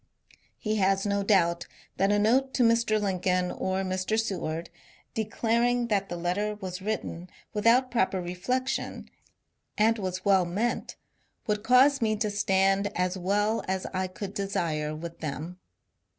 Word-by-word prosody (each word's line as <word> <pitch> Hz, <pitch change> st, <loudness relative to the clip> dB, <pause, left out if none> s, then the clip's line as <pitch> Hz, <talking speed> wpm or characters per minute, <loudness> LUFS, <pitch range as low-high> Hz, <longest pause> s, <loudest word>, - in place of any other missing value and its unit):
He 215 Hz, 0 st, -1 dB
has 195 Hz, 0 st, +2 dB
no 200 Hz, 0 st, +1 dB
doubt 175 Hz, -4 st, +2 dB, 0.3 s
that 195 Hz, +2 st, +3 dB
a 205 Hz, -, +3 dB
note 260 Hz, +6 st, +2 dB
to 250 Hz, -, +3 dB
Mr. 230 Hz, -2 st, +3 dB
Lincoln 185 Hz, -2 st, 0 dB
or 190 Hz, +1 st, -2 dB
Mr. 185 Hz, +3 st, -1 dB
Seward, 170 Hz, -7 st, -3 dB, 0.4 s
declaring 235 Hz, +2 st, 0 dB
that 200 Hz, -2 st, 0 dB
the 175 Hz, -, -4 dB
letter 195 Hz, +5 st, -1 dB
was 185 Hz, -2 st, -6 dB
written 185 Hz, -4 st, -4 dB, 0.2 s
without 235 Hz, +4 st, +3 dB
pro 225 Hz, -6 st, +3 dB
per 190 Hz, -, -3 dB
refiection 220 Hz, +10 st, -3 dB, 0.7 s
and 225 Hz, +1 st, +3 dB
was 185 Hz, -1 st, -4 dB
well 195 Hz, -2 st, +5 dB
meant, 210 Hz, +8 st, -2 dB, 0.5 s
would 210 Hz, -1 st, 0 dB
cause 260 Hz, +4 st, +5 dB
me 215 Hz, -1 st, +2 dB
to 210 Hz, 0 st, -1 dB
stand 195 Hz, 0 st, +2 dB
as 180 Hz, +1 st, 0 dB
well 205 Hz, +4 st, 0 dB
as 190 Hz, 0 st, -2 dB
I 185 Hz, 0 st, -1 dB
could 190 Hz, +1 st, -7 dB
desire 160 Hz, -7 st, -2 dB
with 165 Hz, +2 st, -8 dB
them. 160 Hz, +4 st, -5 dB
195 Hz, 150 wpm, -28 LUFS, 185-220 Hz, 0.7 s, well